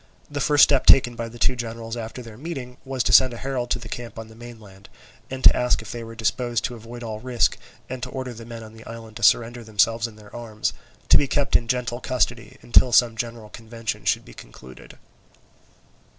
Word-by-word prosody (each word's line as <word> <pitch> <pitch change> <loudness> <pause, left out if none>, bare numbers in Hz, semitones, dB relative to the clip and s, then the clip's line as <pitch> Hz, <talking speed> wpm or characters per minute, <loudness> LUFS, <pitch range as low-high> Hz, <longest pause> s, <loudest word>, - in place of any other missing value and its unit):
The 145 -1 -3
first 145 +1 +5
step 140 -3 +4
taken 120 -2 +7
by 115 -1 -5
the 120 - -12
two 130 +2 +2
generals 115 -1 -5
after 120 +2 -6
their 115 -2 -11
meeting 130 -3 -7
was 135 -2 -2
to - - +1
send 130 -2 +6
a - - -8
herald 130 -1 -3
to - - +1
the 120 - -10
camp 120 -1 -7
on 110 0 -8
the 110 - -15
mainland, 110 -5 -13 0.4
to 130 0 +5
ask 125 0 +1
if 110 - -9
they 120 -1 -6
were 115 0 -9
disposed 120 +1 -1
to 125 - -2
avoid 120 +1 -9
all 110 -2 -5
risk 120 - +1 0.3
and 130 0 -6
to 125 - -4
order 130 -1 -5
the 115 0 -10
men 115 0 -9
on 110 0 -12
the 110 0 -13
island 115 -1 -10
to - - -10
surrender 120 +2 +3
themselves 115 +2 +1
and 110 -2 -14
their 105 -1 -14
arms, 110 -3 -3 0.4
to - - +9
be 140 - +1
kept 140 +1 0
in 115 - +3
gentle 125 0 -1
custody 120 -2 -1
until 120 +1 +5
some 120 0 +5
general 115 -1 -5
convention 110 -2 -6
should 95 - +1
be - - -13
concluded. 65 +1 -13
115 Hz, 220 wpm, -24 LUFS, 110-125 Hz, 0.4 s, to